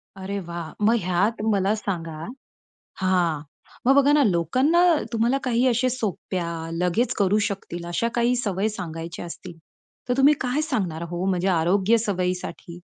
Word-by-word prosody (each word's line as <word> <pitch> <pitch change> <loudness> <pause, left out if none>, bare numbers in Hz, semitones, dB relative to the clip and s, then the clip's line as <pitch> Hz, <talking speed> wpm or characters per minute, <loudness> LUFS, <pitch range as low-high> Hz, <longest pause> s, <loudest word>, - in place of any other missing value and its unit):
अरे 195 +1 -4
वाह! 170 -2 -6
मग 230 +2 +5
ह्यात 190 +5 0
मला 195 +1 +2
सांगा 165 -7 -4 0.8
हां. 175 -5 +1 0.4
मग 270 +2 +5
बघा 280 +1 +5
ना 295 -2 +5
लोकांना 255 - +2 0.3
तुम्हाला 235 +4 +2
काही 245 0 +1
अशा 250 +1 +2
सोप्या, 195 -7 -3 0.3
लगेच 180 +8 +1
करू 200 0 +3
शकतील 175 -3 -6
अशा 175 +7 0
काही 240 +1 +2
सवयी 210 -3 -1
सांगायच्या 165 -4 -6
असतील, 175 0 -9 0.5
तर - - +3
तुम्ही 280 +2 +6
काय 255 +4 0
सांगणार 175 -8 -1
हो? 175 +1 -3
म्हणजे 185 -1 0
आरोग्य 195 +6 +3
सवयीसाठी? 180 -2 -3
195 Hz, 145 wpm, -24 LUFS, 175-235 Hz, 0.8 s, तुम्ही